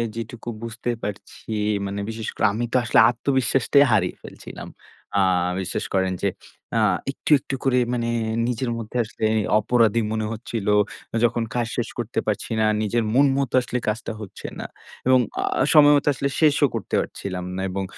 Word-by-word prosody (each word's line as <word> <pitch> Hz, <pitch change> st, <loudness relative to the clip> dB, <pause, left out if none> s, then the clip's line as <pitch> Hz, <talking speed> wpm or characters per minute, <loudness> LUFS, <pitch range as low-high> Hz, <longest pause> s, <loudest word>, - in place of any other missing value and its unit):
যেটুকু 115 Hz, +1 st, -6 dB
বুঝতে 115 Hz, +1 st, -5 dB
পারছি 100 Hz, 0 st, -6 dB, 0.5 s
মানে 100 Hz, +1 st, -4 dB
বিশেষ 110 Hz, -1 st, -5 dB
করে -, -, +1 dB
আমি 120 Hz, +3 st, -1 dB
তো -, -, +5 dB
আসলে 120 Hz, -, +3 dB
আত্মবিশ্বাসটাই 135 Hz, +2 st, +3 dB
হারিয়ে 95 Hz, -5 st, +2 dB
ফেলছিলাম। -, -, -10 dB, 0.5 s
আ -, -, +4 dB, 0.4 s
বিশ্বাস 95 Hz, -, -2 dB
করেন 95 Hz, -1 st, +1 dB
যে -, -, +2 dB, 0.5 s
আ -, -, +3 dB, 0.3 s
একটু, 140 Hz, -, -6 dB
একটু, 135 Hz, -, -5 dB
করে 130 Hz, -2 st, +2 dB, 0.2 s
মানে 120 Hz, -1 st, -1 dB, 0.4 s
নিজের 125 Hz, +1 st, -2 dB
মধ্যে 115 Hz, +1 st, -5 dB
আসলে 110 Hz, 0 st, -4 dB, 0.3 s
অপরাধী 115 Hz, 0 st, +2 dB
মনে 110 Hz, -1 st, -1 dB
হচ্ছিল। 115 Hz, -2 st, -5 dB, 0.6 s
যখন 120 Hz, 0 st, 0 dB
কাজ 120 Hz, -2 st, 0 dB
শেষ 120 Hz, -, -1 dB
করতে 120 Hz, -1 st, -2 dB
পারছি 105 Hz, +1 st, -2 dB
না, 110 Hz, -, +3 dB, 0.2 s
নিজের 115 Hz, +2 st, 0 dB
মন 140 Hz, +3 st, +5 dB
মতো 140 Hz, -3 st, -1 dB
আসলে 125 Hz, 0 st, -3 dB
কাজটা 110 Hz, +1 st, -2 dB
হচ্ছে 100 Hz, -, -8 dB
না। -, -, -5 dB, 0.4 s
এবং 130 Hz, 0 st, +6 dB, 0.2 s
আ -, -, -1 dB, 0.3 s
সময়মতো 145 Hz, -1 st, +6 dB
আসলে 140 Hz, +1 st, -2 dB
শেষও 150 Hz, -2 st, +4 dB
করতে 110 Hz, -6 st, -6 dB
পারছিলাম 95 Hz, -2 st, -4 dB
না 95 Hz, -, -3 dB
এবং 95 Hz, +1 st, -2 dB
115 Hz, 165 wpm, -23 LUFS, 105-125 Hz, 0.6 s, এবং